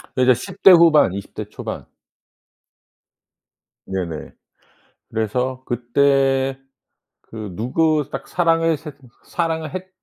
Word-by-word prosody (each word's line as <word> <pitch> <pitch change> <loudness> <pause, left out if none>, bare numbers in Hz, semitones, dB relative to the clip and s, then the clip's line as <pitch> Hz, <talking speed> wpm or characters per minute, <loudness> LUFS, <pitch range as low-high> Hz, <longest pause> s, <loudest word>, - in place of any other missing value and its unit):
그게 130 0 +4
이제 - - +7
10 120 - -9
대 195 - +10
후반 165 - +6
20 100 0 -7
대 - - -5
초반. - - -7 2.0
네네. 90 -5 -5 0.8
그래서 125 +4 -2
그때 135 +2 +1 0.6
그 105 -4 -9
누구 150 +5 +1
딱 - - -6
사랑을 165 -2 +2
새 155 +1 -9 0.3
사랑을 160 -3 -2
했 185 0 -6
135 Hz, 175 characters per minute, -20 LUFS, 120-160 Hz, 2.0 s, 대